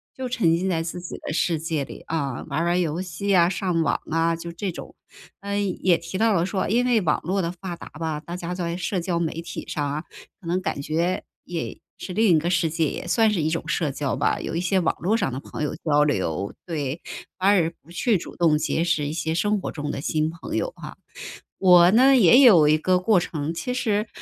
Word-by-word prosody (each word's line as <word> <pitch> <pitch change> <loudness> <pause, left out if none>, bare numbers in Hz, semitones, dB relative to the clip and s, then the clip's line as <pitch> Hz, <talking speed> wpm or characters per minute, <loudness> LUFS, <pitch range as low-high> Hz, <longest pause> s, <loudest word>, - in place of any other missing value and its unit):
就 260 -1 -4
沉 180 -10 +2
浸 185 +3 -1
在 165 -3 0
自 170 +2 -5
己 175 - -7
的 - - -3
世 165 0 +1
界 160 -2 -2
里 - - -10
啊， 140 -5 -2
玩 155 +4 -1
玩 175 +1 +2
游 170 0 -1
戏 190 +3 -1
啊， 170 -1 +5
上 180 -2 -1
网 - - 0
啊， 165 +1 +1
就 170 +1 -7
这 185 +3 -3
种。 - - -10 0.5
嗯， 200 -2 -2
也 180 -3 +5
提 170 +3 -6
到 225 0 +3
了 170 -3 +2
说 190 0 -2
因 240 +4 +2
为 240 -3 +3
网 155 -5 +1
络 190 +4 0
的 170 -1 -2
发 180 0 -7
达 170 - -11
吧， 155 0 -4
大 170 +3 -7
家 175 0 -4
在 170 -1 -3
社 185 +1 -2
交 170 -1 -1
媒 165 -2 -1
体 165 -1 -7
上 150 - -2
啊， 150 +2 -3 0.4
可 180 - -12
能 180 +2 0
感 140 - -3
觉 165 +5 -1 0.2
也 170 -2 -5 0.2
是 185 - -7
另 220 +2 +3
一 - - +4
个 170 +3 -2
世 170 -2 +1
界， 165 +1 0
也 - - -6
算 225 +4 +3
是 190 -6 0
一 155 - +1
种 165 0 -3
社 165 -3 0
交 140 0 -2
吧， - - 0
有 - - -4
一 170 - 0
些 185 +2 +1
网 165 - 0
络 205 +6 +1
上 135 - -1
的 130 - -3
朋 - - -6
友 150 - -2
交 150 -2 +3
流， 95 - -1
对。 150 -3 -3 0.4
反而 185 -4 +3
不 165 - -18
去 215 +4 +1
主 175 - -9
动 165 -3 +3
结 160 +2 0
识 165 -4 0
一 150 - -3
些 160 0 -2
生 205 +4 +1
活 - - -5
中 150 -2 -5
的 - - -4
新 155 +1 0
朋 165 0 -7
友 - - -1
哈。 - - -9 0.6
我 180 -2 +7
呢 260 +5 +6
也 245 +2 +7
有 185 - +7
一 155 +1 +4
个 180 +4 +2
过 190 +1 +3
程， 160 -2 -3
其 250 +9 -3
实， 215 -3 0
170 Hz, 260 characters per minute, -24 LUFS, 160-190 Hz, 0.6 s, 我